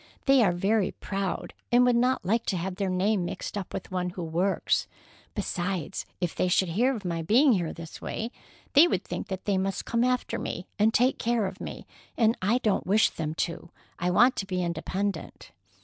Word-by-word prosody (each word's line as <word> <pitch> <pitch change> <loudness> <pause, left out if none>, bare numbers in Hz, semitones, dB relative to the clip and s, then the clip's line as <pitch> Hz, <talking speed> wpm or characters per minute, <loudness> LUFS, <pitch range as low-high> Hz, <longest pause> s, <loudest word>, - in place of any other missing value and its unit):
They 270 -2 +6
are 200 -6 +4
very 195 +3 +1
proud, 195 -1 -3 0.2
and 245 +1 +6
would 245 -1 +4
not 250 -2 +2
like 225 +5 +2
to 185 - 0
have 180 +2 -4
their 200 -2 -1
name 190 +2 +1
mixed 175 - -5
up 200 -3 -4
with - - -6
one 180 -1 -1
who 180 0 -6
works. 175 +4 0 0.5
Besides, 180 -1 -3
if 175 -3 -1
they - - 0
should 180 0 +2
hear 245 +10 +2
of 210 -4 -7
my 170 -2 -1
being 245 - +5
here 175 -5 0
this 165 -1 -9
way, 225 +2 -4 0.4
they 295 +5 +8
would 190 - -1
think - - -5
that 190 -2 -5
they 200 -2 +1
must 195 0 -2
come 235 0 +1
after 250 0 0
me 180 - -4
and 215 +2 +5
take 250 +3 +2
care 235 -2 +1
of 190 - -6
me, - - -7 0.3
and 225 0 +4
I 210 +6 +3
don't 210 -5 +1
wish 210 +3 +4
them 155 -1 -4
to. 170 0 -8 0.3
I 180 - 0
want 240 +8 +5
to 195 - -3
be 185 -2 -1
independent." 175 - -3
195 Hz, 205 wpm, -27 LUFS, 180-230 Hz, 0.5 s, they